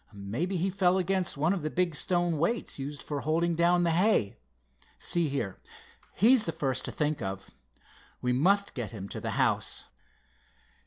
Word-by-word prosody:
"Mebbe 110 - -3
he 185 +3 0
fell 185 -1 +2
against 185 -3 0
one 155 +6 +2
of 195 - -3
the 155 - -2
big 180 0 0
stone 175 +1 0
weights 190 0 -1
used 140 +1 -5
for 145 -2 -3
holding 170 +3 +1
down 175 +1 +3
the 170 - +2
hay. 175 - +2 0.6
See 170 -3 +1
here, 115 -9 -3 0.6
he's 230 +3 +5
the 165 - -1
first 130 -4 -2
to - - -4
think 150 -2 -1
of. 95 -1 -5 0.7
We 125 0 0
must 200 +10 +2
get 120 -5 -4
him 100 -4 -7
to - - -5
the - - -3
house." - - 0
165 Hz, 170 wpm, -29 LUFS, 135-180 Hz, 0.7 s, he's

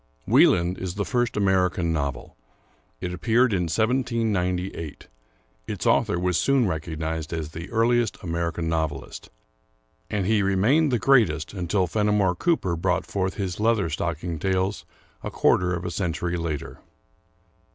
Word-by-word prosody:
"Wieland" 90 +1 +4
is 90 -1 -4
the 100 0 -2
first 120 -2 0
American 90 -4 +1
novel. 70 -5 -3 0.7
It 90 0 -3
appeared 115 +5 +2
in 90 -2 +1
1798; 100 - -1 0.6
its - - -4
author 85 - +2
was 90 -2 +1
soon 135 - +3
recognized 80 -1 -3
as 80 -3 -3
the 85 +4 -8
earliest 115 0 +1
American 85 -1 -2
novelist; 80 -5 -3 0.8
and 100 -3 -1
he 110 +1 +2
remained 110 +11 +3
the 120 - +2
greatest, 105 - +2
until 90 0 0
Fenimore 105 0 +1
Cooper 95 - 0
brought 90 +1 0
forth 95 0 -2
his 95 -3 -3
Leather 105 -6 +1
stocking 85 +1 -3
Tales, 95 +3 -1 0.4
a - - -4
quarter 90 0 +2
of 85 0 -5
a 90 - -3
century 90 -1 -2
later. 80 -4 -4
90 Hz, 135 wpm, -25 LUFS, 85-105 Hz, 0.8 s, Wieland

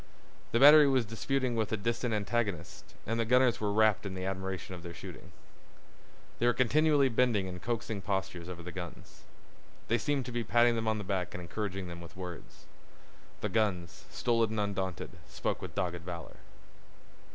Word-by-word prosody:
The 115 - +2
battery 145 +2 +9
was 130 -3 +3
disputing 125 +3 -1
with 110 -2 -1
a 110 - +1
distant 115 +3 -1
antagonist 105 -5 -2
and 115 +2 -1
the - - +3
gunners 125 0 +3
were 105 -1 +1
wrapped 110 -1 +3
in 95 -2 -5
admiration 95 -1 -4
of 90 - -7
their 85 -1 -8
shooting. - - -10 1.1
They 120 - +3
were 120 - +4
continually 145 +2 +4
bending 115 -5 +2
in 90 -1 -6
coaxing 110 -1 -3
postures 90 -3 -3
over 85 -1 -7
the 90 - -6
guns. 90 -1 -9 0.6
They 120 - +3
seemed 145 -3 0
to 125 - -5
be 120 0 -1
patting 120 +2 +4
them 115 -1 -2
on 110 0 +2
the 105 - -4
back 95 -3 -2
and - - -4
encouraging 95 +1 -4
them 85 0 -8
with 85 +1 -12
words. 90 -2 -8 0.8
The - - -1
guns, 95 -7 -1
stolid 115 -2 +1
and 110 0 -2
undaunted, 95 -4 -2 0.2
spoke - - -3
with - - -7
dogged 90 -3 -2
valor. 85 -1 -7
105 Hz, 175 wpm, -31 LUFS, 90-120 Hz, 1.1 s, battery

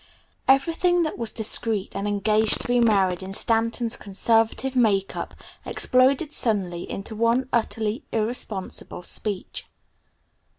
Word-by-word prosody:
VIII 270 - +8
Everything 340 +5 0
that 310 - -3
was 230 -2 -2
discreet 220 -2 0
and 200 +1 -3
engaged 210 +1 +2
to - - -1
be 245 0 +2
married 195 -6 +2
in 190 +1 -5
Stanton's 230 +1 +2
conservative 225 +6 0
make 205 -6 +1
up - - -6 0.3
exploded 270 +4 +2
suddenly 185 -7 -1
into 200 +3 -6
one 230 +4 +1
utterly 225 +1 -1
irresponsible 215 -5 -3
speech. 200 +1 -3
225 Hz, 125 wpm, -24 LUFS, 200-245 Hz, 0.3 s, VIII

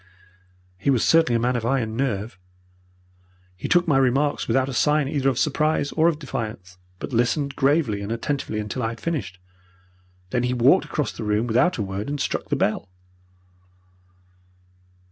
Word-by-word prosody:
"He 105 - 0
was 130 -5 +3
certainly 165 -7 +4
a - - +2
man 125 +2 +1
of 120 - -2
iron 115 -3 0
nerve. 110 -5 -2 1.2
He 90 - -5
took 175 0 +3
my 140 -4 +4
remarks 135 +3 +1
without 130 0 +2
a 135 - -4
sign 150 +5 +2
either 135 -1 +1
of 130 - -2
surprise 150 +1 +1
or 160 +1 +3
of 165 -3 +1
defiance, 110 - -6 0.2
but 125 - -7
listened 135 +4 0
gravely 135 -7 +1
and 100 +2 -5
attentively 115 -1 -2
until 105 +4 -4
I 115 - 0
had 115 0 -8
finished. 125 - -3 0.9
Then 125 - +1
he 125 +1 0
walked 130 +10 +4
across 150 - -2
the - - -7
room 105 +2 +1
without 120 +10 +2
a 110 - -1
word 100 +4 -4
and 145 0 -3
struck - - -2
the - - +1
bell. 100 -2 -1
125 Hz, 170 wpm, -23 LUFS, 110-145 Hz, 1.2 s, certainly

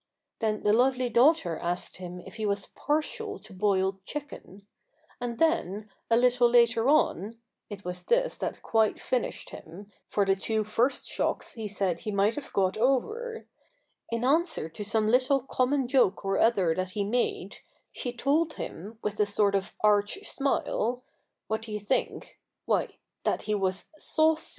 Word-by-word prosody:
"'* - - -60
Then 215 -1 0
the 210 - +4
lovely 255 +1 +3
daughter 235 - +3
asked 175 +1 -2
him 180 -1 -7
if - - -11
he 220 - -4
vfdiS 200 -1 -2
partial 315 +8 -2
lo - - -11
boiled 190 -1 +1
chicken; 205 -7 -8 0.5
and 240 -1 -4
then, 215 - 0 0.2
a 230 - +5
little 245 0 +4
later 235 0 +4
on 230 - +2 0.2
— - - -57
it 205 -3 -8
was 180 0 -4
this - - +1
that - - -4
quite 220 -1 +2
finished 255 -2 -2
him, 195 +6 -11 0.2
for 205 - +1
the 195 0 +3
two 220 +3 -1
first 230 +5 0
shocks - - -2
he 220 -2 -5
said 195 -4 -1
he 215 - -4
might 200 +2 +2
have 295 - -7
got 190 0 +1
over 435 - 0 0.3
— - - -40
in 230 +1 -1
answer 315 - +2
to 185 +6 -7
some 215 +1 +1
little 255 +4 +3
common 260 +1 0
joke 245 -7 +2
or 195 0 +1
other 195 -8 +3
that 185 +1 -3
he 205 - +1
made, 235 +5 -1 0.3
she 245 - -4
told 295 +6 +1
him, 210 +7 -7
with 210 0 -3
a 210 - +3
sort 205 0 +2
of 195 -1 -1
arch 205 - +3
smile 250 -3 -1 0.2
— - - -56
what 220 +1 -1
do 225 -1 -8
you 210 - -2
think? 210 +6 -2 0.3
why, - - +1 0.4
that - - 0
he 215 - -1
was 190 -2 -1
saua'.'' 315 0 +3
220 Hz, 175 wpm, -28 LUFS, 200-260 Hz, 0.5 s, a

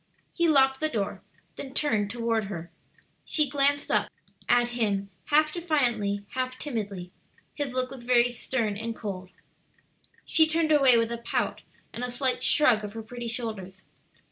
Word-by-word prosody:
He 340 -1 +2
locked 270 -3 +4
the 310 - +1
door, 210 -8 -3 0.4
then 270 0 -8
turned 215 -10 +1
toward 230 -1 -1
her. 170 -4 -7 0.5
She 305 -2 +1
glanced 285 +1 +1
up - - +2 0.4
at 240 0 +4
him 205 -5 -1
half 305 +1 +3
defiantly, 240 - 0
half 255 0 -3
timidly. 205 -10 -5 0.4
His 285 -4 -3
look 255 0 -1
was 265 -3 -9
very 240 0 +4
stern 230 -3 -2
and 225 +2 -4
cold. 190 -4 -6 1.0
She 320 -1 +4
turned 315 0 +1
away 270 -5 +6
with 230 0 +1
a 235 - -3
pout 235 - -2 0.3
and 240 - -5
a 250 - -2
slight 250 +1 0
shrug 250 -8 +4
of 205 0 -6
her 225 0 -6
pretty 240 +1 -7
shoulders. 215 -5 -5
240 Hz, 160 wpm, -27 LUFS, 215-275 Hz, 1.0 s, away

